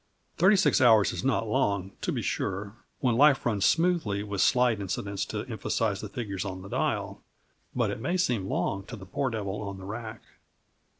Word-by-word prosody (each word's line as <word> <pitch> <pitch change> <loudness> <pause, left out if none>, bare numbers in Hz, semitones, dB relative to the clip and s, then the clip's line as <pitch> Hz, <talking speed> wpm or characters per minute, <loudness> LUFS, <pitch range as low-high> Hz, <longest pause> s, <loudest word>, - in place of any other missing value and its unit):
Thirty 190 +4 +5
six 190 -7 +3
hours 110 -5 +5
is - - -4
not 125 -4 +1
long, 100 -6 0
to - - -1
be - - -2
sure, 100 +2 -3 0.3
when 125 -3 +2
life 145 0 +5
runs 105 -6 +1
smoothly 165 - +2
with 100 -2 -2
slight 125 -4 +3
incidents 100 +1 -3
to - - -4
emphasize 105 -3 -1
the 105 - -6
figures 100 -6 -4
on 95 -2 -6
the 100 - -9
dial, - - -2 0.5
but - - +1
it - - -5
may 175 +8 0
seem 120 - 0
long 100 0 -1
to 120 - -7
the 100 -3 -10
poor 130 +8 -1
devil 105 -3 -4
on 100 -2 -5
the 95 - -10
rack. 110 +2 -7
110 Hz, 190 wpm, -28 LUFS, 100-125 Hz, 0.5 s, Thirty